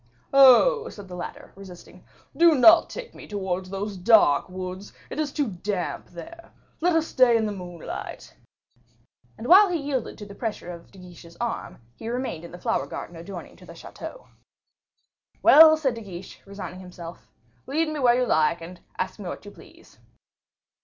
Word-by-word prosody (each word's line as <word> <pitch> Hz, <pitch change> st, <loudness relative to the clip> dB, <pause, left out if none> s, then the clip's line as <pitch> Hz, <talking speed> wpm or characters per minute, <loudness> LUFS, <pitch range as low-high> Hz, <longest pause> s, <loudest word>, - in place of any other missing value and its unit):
"Oh!" 275 Hz, -, +6 dB
said 205 Hz, -2 st, -11 dB
the 180 Hz, -, -9 dB
latter, 175 Hz, -, -8 dB
resisting, 190 Hz, -3 st, -13 dB, 0.3 s
"do 335 Hz, -1 st, +5 dB
not 330 Hz, +6 st, +6 dB
take -, -, -8 dB
me -, -, -12 dB
towards 190 Hz, -2 st, -4 dB
those 200 Hz, +1 st, -4 dB
dark 185 Hz, -7 st, +4 dB
woods, 185 Hz, +1 st, -7 dB, 0.2 s
it -, -, -5 dB
is 300 Hz, -2 st, -1 dB
too 290 Hz, -2 st, -1 dB
damp 185 Hz, -1 st, -4 dB
there. 335 Hz, -, -12 dB, 0.3 s
Let 350 Hz, +1 st, +2 dB
us 325 Hz, -1 st, +2 dB
stay 250 Hz, -6 st, +4 dB
in 220 Hz, -, 0 dB
the 210 Hz, -, -2 dB
moonlight." 175 Hz, -4 st, -8 dB, 1.0 s
And -, -, -8 dB
while 385 Hz, +7 st, +7 dB
he 350 Hz, -, 0 dB
yielded 280 Hz, -5 st, -4 dB
to 210 Hz, -, -9 dB
the 200 Hz, -, -11 dB
pressure 210 Hz, -5 st, -5 dB
of 170 Hz, -1 st, -11 dB
De -, -, -18 dB
Guiche's 175 Hz, -2 st, -14 dB
arm, 235 Hz, -1 st, -4 dB, 0.2 s
he 225 Hz, -, -7 dB
remained 245 Hz, -9 st, -4 dB
in 170 Hz, -, -10 dB
the 175 Hz, -, -9 dB
flower 230 Hz, +4 st, -1 dB
garden 175 Hz, -, -8 dB
adjoining 170 Hz, +2 st, -9 dB
the -, -, -13 dB
chateau. -, -, -10 dB, 1.2 s
"Well," 315 Hz, 0 st, +8 dB
said 275 Hz, -5 st, 0 dB
De 230 Hz, -, -8 dB
Guiche, 185 Hz, -3 st, -10 dB
resigning 195 Hz, -2 st, -8 dB
himself, 175 Hz, -2 st, -11 dB, 0.4 s
"lead 315 Hz, +4 st, 0 dB
me 305 Hz, -1 st, -4 dB
where 245 Hz, -3 st, +4 dB
you 250 Hz, -, +2 dB
like, 160 Hz, -3 st, +2 dB
and 175 Hz, +2 st, -10 dB, 0.2 s
ask 190 Hz, -, -4 dB
me 190 Hz, -4 st, -6 dB
what -, -, -8 dB
you 205 Hz, -, -10 dB
please." -, -, -18 dB
205 Hz, 175 wpm, -25 LUFS, 180-280 Hz, 1.2 s, Well